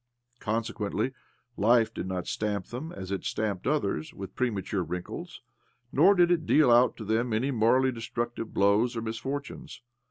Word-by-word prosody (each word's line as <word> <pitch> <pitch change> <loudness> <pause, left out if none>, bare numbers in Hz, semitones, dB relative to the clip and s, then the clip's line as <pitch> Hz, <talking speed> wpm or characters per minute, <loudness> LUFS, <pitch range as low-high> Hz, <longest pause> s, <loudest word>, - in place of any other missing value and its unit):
Consequently, 115 +2 -2 0.5
life 115 +1 +3
did - - -4
not 90 -1 -3
stamp| 105 -3 -2
them, 140 +8 -6
as 95 -1 -7
it 100 - -2
stamped 105 -3 -2
others, 100 - -1
with 95 -1 -8
premature 100 -6 -1
j 80 - -11
wrinkles; 90 0 -6 0.5
nor 185 +8 +5
did 175 -1 +4
it 165 -2 +1
deal 150 -5 +5
out 120 +2 +5
to 110 - -7
them 115 +3 0
any! 125 +6 +1
morally 130 +3 +3
destructive 120 -1 -4
blows 105 +5 +2
or 115 - -3
misfortunes.) 135 +5 -5
115 Hz, 160 wpm, -28 LUFS, 100-130 Hz, 0.5 s, nor